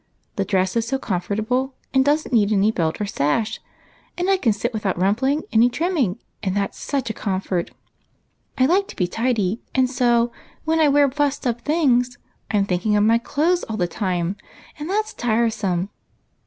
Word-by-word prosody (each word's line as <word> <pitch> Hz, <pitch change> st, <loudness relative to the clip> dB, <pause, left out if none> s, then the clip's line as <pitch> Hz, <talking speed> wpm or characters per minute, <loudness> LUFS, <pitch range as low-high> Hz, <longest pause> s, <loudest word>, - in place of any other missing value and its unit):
The 195 Hz, -, 0 dB
dress 190 Hz, -1 st, +1 dB
is 230 Hz, -1 st, 0 dB
so 270 Hz, +2 st, 0 dB
comfortable, 220 Hz, +6 st, -1 dB, 0.2 s
and 265 Hz, -1 st, +5 dB
does 295 Hz, +3 st, +2 dB
n't -, -, -8 dB
need 215 Hz, -3 st, +4 dB
any 210 Hz, +1 st, +3 dB
belt 165 Hz, -6 st, -1 dB
or 210 Hz, -, -1 dB
sash, 205 Hz, +6 st, -1 dB, 0.6 s
and 360 Hz, +2 st, +1 dB
I 385 Hz, -, +4 dB
can 245 Hz, -11 st, +2 dB
sit 235 Hz, +4 st, -2 dB
with 220 Hz, -, -4 dB
out 190 Hz, -4 st, 0 dB
rumpling 245 Hz, -, +1 dB
any 230 Hz, +2 st, +5 dB
trimming, 280 Hz, -, 0 dB, 0.3 s
that 200 Hz, 0 st, -1 dB
's -, -, -14 dB
such 270 Hz, -5 st, -2 dB
a -, -, -6 dB
comfort! 190 Hz, -4 st, -2 dB, 0.9 s
I 260 Hz, -, +4 dB
like 380 Hz, +7 st, +2 dB
to -, -, -10 dB
be 180 Hz, -, +1 dB
tidy, 225 Hz, 0 st, 0 dB
and 260 Hz, -1 st, +4 dB
so, 240 Hz, -2 st, +2 dB, 0.3 s
when 320 Hz, +1 st, +2 dB
I 310 Hz, -, +5 dB
wear 285 Hz, 0 st, +5 dB
fussed 285 Hz, 0 st, -1 dB
up 240 Hz, -1 st, -1 dB
things, 250 Hz, -5 st, +2 dB, 0.3 s
I 210 Hz, -, +1 dB
'm 200 Hz, -, +2 dB
thinking 195 Hz, +3 st, 0 dB
of 205 Hz, -, +3 dB
my 225 Hz, +2 st, +4 dB
clothes 325 Hz, +8 st, +1 dB
all 220 Hz, -, -4 dB
the 180 Hz, -, +1 dB
time, 185 Hz, 0 st, -2 dB, 0.4 s
and 300 Hz, +3 st, -5 dB
that 425 Hz, +2 st, +1 dB
's -, -, -9 dB
tiresome. 220 Hz, -6 st, 0 dB
230 Hz, 195 wpm, -22 LUFS, 200-270 Hz, 0.9 s, and